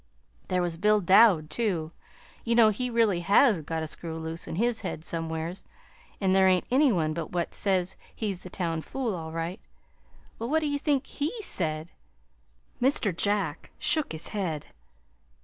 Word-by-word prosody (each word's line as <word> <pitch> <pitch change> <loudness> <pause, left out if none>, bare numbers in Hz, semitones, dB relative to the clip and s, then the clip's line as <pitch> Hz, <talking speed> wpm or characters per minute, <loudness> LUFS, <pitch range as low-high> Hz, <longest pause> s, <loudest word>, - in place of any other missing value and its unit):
There 180 -1 +1
was 170 -2 -2
Bill 210 +1 +4
Dowd, 185 -4 +5
too. 180 -9 -1 0.5
You 230 0 +1
know 230 -2 +7
he 250 +4 -1
really 225 -6 +2
HAS 200 - +4
got 160 +1 -3
a - - -3
screw 160 +1 -6
loose 160 +1 -5
in - - -4
his 235 +4 +1
head 170 -5 -5
somewheres, 165 +2 -3 0.6
an' 190 -2 +2
there 190 0 +5
ain't 185 -1 +3
any 275 +1 +5
one 160 -6 0
but 165 -1 -5
what 175 -1 -1
says 185 -2 +1 0.2
he's 200 -5 -2
the 185 - -10
town 165 -3 -2
fool, 245 +3 -3
all 160 -3 -6
right. 165 +5 -4 0.8
Well, 230 +2 -3
what 315 +2 +2
do 305 - 0
ye 285 0 -1
think 285 -2 +1
HE 420 +11 -3
said?" 160 - -2 0.9
Mr. 245 - +2
Jack 205 +3 -1
shook 310 -3 +1
his 160 0 -6
head. 175 -8 -3
185 Hz, 170 wpm, -27 LUFS, 165-230 Hz, 0.9 s, know